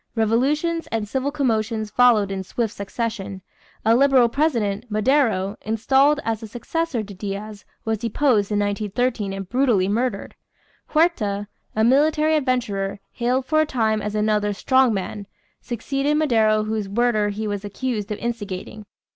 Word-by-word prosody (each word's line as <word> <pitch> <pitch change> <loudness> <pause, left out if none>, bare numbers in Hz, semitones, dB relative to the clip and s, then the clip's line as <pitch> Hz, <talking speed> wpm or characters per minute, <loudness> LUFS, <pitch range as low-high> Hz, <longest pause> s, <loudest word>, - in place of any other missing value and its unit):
Revolutions 285 +10 +1
and 220 -2 -2
civil 265 +5 -1
commotions 225 -6 -1
followed 220 -5 +4
in 195 -1 -3
swift 225 +3 -2
succession. 200 -2 -4 0.4
A 225 - +5
liberal 260 -2 +5
president, 230 -7 0
Madero, 215 -3 +1
installed 265 +7 +2
as 225 -1 -1
the 220 - -8
successor 245 +3 -2
to 205 -1 -10
Diaz, 205 +2 -6 0.2
was 220 -1 -1
deposed 230 -2 +1
in 210 - +1
1913 205 +1 -1
and 195 -1 -5
brutally 240 -5 +2
murdered. 240 +5 -1 0.5
Huerta, 215 - +1 0.3
a 220 - +2
military 305 +5 +3
adventurer, 235 -9 -1
hailed 250 +2 0
for 310 +3 +3
a - - +2
time 220 -5 0
as 210 0 -4
another 210 -1 +1
"strong 260 +4 +3
man," 200 0 -4 0.3
succeeded 275 +5 -1
Madero 220 -8 +3
whose 215 -2 -3
murder 215 -1 +1
he 210 +2 -4
was 205 -1 -3
accused 215 0 -3
of 210 - -2
instigating. 210 -3 -5
225 Hz, 145 wpm, -22 LUFS, 205-260 Hz, 0.5 s, A